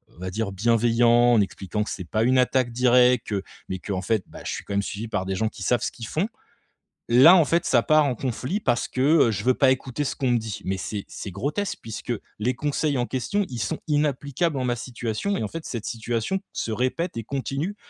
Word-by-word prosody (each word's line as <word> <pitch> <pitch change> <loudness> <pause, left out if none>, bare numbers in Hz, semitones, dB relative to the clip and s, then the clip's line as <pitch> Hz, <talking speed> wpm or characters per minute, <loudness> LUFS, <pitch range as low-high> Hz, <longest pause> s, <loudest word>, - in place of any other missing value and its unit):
on - - -19
va 95 +1 -4
dire 110 0 -2
bienveillant, 120 +3 +4
en 110 - +5
expliquant 100 +1 -2
que - - -6
c'est 90 - -5
pas 110 +1 +1
une 130 +2 +3
attaque 125 -1 +2
directe, 125 -1 +3 0.4
mais 95 -1 -3
qu'en 95 -2 -3
fait, 105 +1 0
bah - - -11
je - - -2
suis - - -5
quand 100 - -5
même 100 - +2
suivi 105 +3 -5
par 95 -3 -2
des 95 0 -2
gens 110 +3 0
qui 105 - -13
savent 120 +2 +2
ce - - -1
qu'ils 115 -3 -8
font, 170 +7 -1 0.8
là, 135 +10 +8
en 165 - +5
fait, 170 +2 +1
ça 120 -3 +3
part 155 -1 +4
en 130 -3 0
conflit 130 - -2
parce 120 -8 +1
que, - - -6 0.3
heu, 115 - +1
je 105 0 -3
veux 130 - +5
pas 135 -2 +4
écouter 130 +2 -2
ce - - -2
qu'on 130 -3 0
me 120 - +4
dit! 110 -3 -6
Mais 95 +1 -1
c'est 100 +2 -4
c'est 100 - -7
grotesque 145 - -3
puisque 115 +2 -5 0.3
les 125 +4 +1
conseils 145 0 0
en 120 - +1
question, 195 +10 -1
ils 125 -2 -5
sont 110 - -2
inapplicables 145 +1 0
en 130 - -1
ma 120 -1 +1
situation 120 - -3
et, - - -2
en 105 - -1
fait, 165 -1 -7
cette 115 -4 -5
situation 115 - -2
se 115 - -3
répète 130 - -1
et 115 - -3
continue 140 - -3
120 Hz, 240 wpm, -24 LUFS, 110-135 Hz, 0.8 s, là